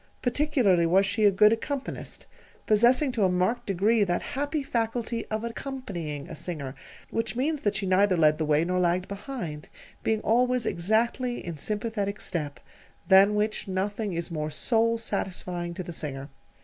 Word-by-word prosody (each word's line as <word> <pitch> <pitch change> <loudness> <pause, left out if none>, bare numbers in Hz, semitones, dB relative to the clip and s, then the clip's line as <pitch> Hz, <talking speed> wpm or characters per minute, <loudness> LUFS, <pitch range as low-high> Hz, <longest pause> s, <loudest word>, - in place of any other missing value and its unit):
Particularly 245 - +3
was 190 +4 +4
she 210 +2 +1
a 205 - +7
good 210 +3 +5
accompanist, 275 +4 -5 0.4
possessing 245 +6 +4
to 230 -4 0
a 190 - +4
marked 185 +7 0
degree 205 +3 +3
that 175 -3 -1
happy 290 +2 -1
faculty 230 -1 -2
of 215 +1 -3
accompanying 205 - -5
a - - -8
singer: 145 -7 -5 0.4
which 225 +1 -2
means 285 +4 0
that 205 -1 0
she 195 0 -1
neither 190 0 +3
led 155 -1 +4
the 155 - 0
way 150 +2 +2
nor 180 +1 0
lagged 180 +1 +1
behind, 200 - -6 0.3
being 220 -1 +1
always 245 +1 +2
exactly 230 +7 0
in 170 -2 -4
sympathetic 210 +1 -2
step 150 -4 -4 0.5
than 195 +2 +7
which 210 0 -1
nothing 200 +2 -2
is 170 +1 -3
more 155 -1 -2
soul 230 +7 +2
satisfying 180 -5 -3
to 185 - -4
the 175 - -7
singer. 140 -3 -5
205 Hz, 160 wpm, -27 LUFS, 175-230 Hz, 0.5 s, a